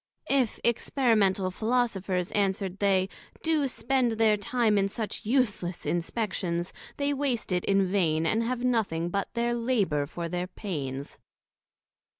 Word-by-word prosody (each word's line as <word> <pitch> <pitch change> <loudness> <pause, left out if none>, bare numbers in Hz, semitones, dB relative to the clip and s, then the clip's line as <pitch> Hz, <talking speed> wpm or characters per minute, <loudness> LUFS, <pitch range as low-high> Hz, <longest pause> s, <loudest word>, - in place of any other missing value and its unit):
If 265 -5 +2
Experimental 215 -6 +2
Philosophers, 195 -5 0
answer'd 195 -1 0
they, 190 -2 +3 0.4
do 315 -3 +2
spend 245 -1 +1
their 220 -1 +4
time 215 0 +1
in 195 - +2
such 210 0 -4
useless 210 -8 0
Inspections, 175 -1 -2 0.2
they 285 0 +1
waste 265 -7 -1
it 180 -1 +1
in 195 -1 +3
vain, 165 -4 +1
and 220 +7 +2
have 245 +1 -2
nothing 205 -9 +1
but 200 +2 -2
their 235 0 +1
labour 210 - +1
for 170 +2 -5
their 180 +1 -3
pains. 140 -9 -5
205 Hz, 135 wpm, -28 LUFS, 180-235 Hz, 0.4 s, their